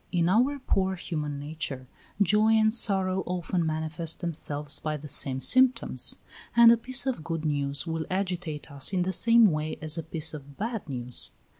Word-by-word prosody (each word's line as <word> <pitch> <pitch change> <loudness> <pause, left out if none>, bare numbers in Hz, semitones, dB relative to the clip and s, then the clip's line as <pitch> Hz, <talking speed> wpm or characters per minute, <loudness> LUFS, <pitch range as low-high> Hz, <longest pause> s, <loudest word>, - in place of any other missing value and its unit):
In 170 -2 +1
our 250 +9 +2
poor 190 -8 -1
human 150 -5 -4
nature, 145 -3 -6 0.3
joy 210 +3 +3
and 220 0 +3
sorrow 190 -4 +2
often 180 0 -2
manifest 160 +1 -3
themselves 150 -4 -2
by 155 -1 -3
the 150 +1 -10
same 135 -2 +2
symptoms; 255 - +2 0.4
and 235 -1 +8
a 235 - +4
piece 250 +2 +1
of 255 -12 -2
good 165 0 -4
news 140 -1 -1
will 160 -1 -4
agitate 180 -6 -3
us 140 +5 -1
in 180 -1 +1
the 190 +1 -2
same 230 +1 +5
way 155 0 -3
as 155 +1 +3
a - - -2
piece 160 0 -3
of 140 -2 -11
bad 225 -5 -4
news. 125 -2 -3
165 Hz, 175 wpm, -27 LUFS, 150-205 Hz, 0.4 s, and